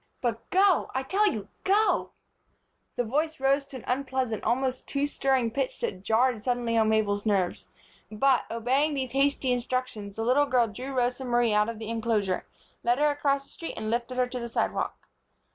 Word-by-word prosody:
But 235 -3 -3
go, 380 -1 +3
I 265 - 0
tell 405 +9 +2
you, 210 -3 -5 0.2
go!" 415 +3 +2 0.9
The 245 - 0
voice 305 +7 -1
rose 275 +1 +2
to 275 -1 -8
an 245 - -11
unpleasant, 260 -4 -1
almost 260 +1 0
too 280 0 0
stirring 265 -5 +1
pitch 270 +2 -2
that 185 - -3
jarred 225 +2 +2
suddenly 240 -1 0
on 220 -1 +3
Mabel's 205 -2 +1
nerves; 195 -5 0 0.4
but, 255 +4 +2
obeying 265 +6 +1
these 260 -3 -2
hasty 275 -1 +1
instructions, 245 -5 -2
the 225 - -2
little 280 +4 +3
girl 250 -3 +3
drew 250 +6 -7
Rosa 250 0 0
Marie 240 -3 +2
out 210 +1 +3
of 230 - -5
the 220 0 -6
inclosure, 220 -5 -1 0.4
led 240 +1 +2
her 295 +1 +3
across 280 -1 0
the - - -18
street 330 - -7
and 215 0 -3
lifted 240 +2 -2
her 250 - +3
to 250 0 -5
the 235 - -4
sidewalk. - - -2
250 Hz, 185 wpm, -27 LUFS, 225-275 Hz, 0.9 s, go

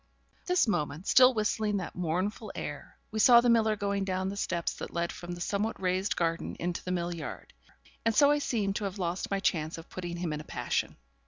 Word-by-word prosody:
But - - -34
at - - -27
this 360 -7 +3
moment, 155 -3 -1
still 255 -1 +6
whistling 210 -1 0
that 185 - -5
mournful 180 +6 -2
air, - - -6
we 220 - -3
saw 235 +2 +8
the 240 0 +4
miller 220 -2 +3
going 200 -1 -1
down 190 0 -1
the 200 - -5
steps 175 -4 -1
that - - -5
led 170 0 -1
from 175 0 -7
the 175 - -8
somewhat 205 +4 -1
raised 185 +1 0
garden 165 -1 -1
into 175 0 -3
the 180 - -3
mill 175 -1 -1
yard; 165 -2 -7 0.5
and 230 -1 +1
so 285 +4 +6
I 295 - +3
seemed 210 -8 -1
to 210 - -3
have 195 0 -4
lost 180 -1 -2
my 195 - 0
chance 160 -4 0
of 165 - -11
putting 175 -1 -5
him 170 -3 -2
in 150 - -4
a - - -10
passion. - - -2
190 Hz, 230 wpm, -30 LUFS, 175-215 Hz, 0.5 s, saw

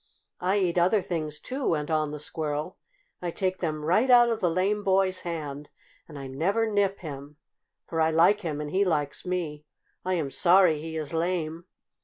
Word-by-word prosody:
"I 185 +3 +1
eat 180 -3 +1
other 185 +3 +3
things, 155 -3 -3
too," 265 - -5
went 150 -1 0
on 155 -1 +1
the 150 - -5
Squirrel. 150 +2 -4 0.4
"I 175 - -2
take 185 +2 -2
them 155 -3 -3
right 210 +11 +3
out 240 -1 +7
of 225 -2 -1
the 180 -5 +2
lame 195 +5 0
boy's 190 -1 +2
hand, 150 -4 -5 0.4
and 150 - -10
I 135 - -7
never 175 +12 0
nip 200 -2 0
him, 145 -2 -8 0.5
for 165 -1 -1
I 160 - +4
like 170 +6 +4
him 155 -5 -3
and 150 -1 -5
he 195 +2 +2
likes 150 -2 -1
me. 165 -5 -3 0.4
I 185 0 0
am 150 -6 -2
sorry 175 -3 +4
he 160 0 -5
is 155 0 -5
lame." 165 -1 -2
170 Hz, 190 wpm, -27 LUFS, 150-190 Hz, 0.5 s, out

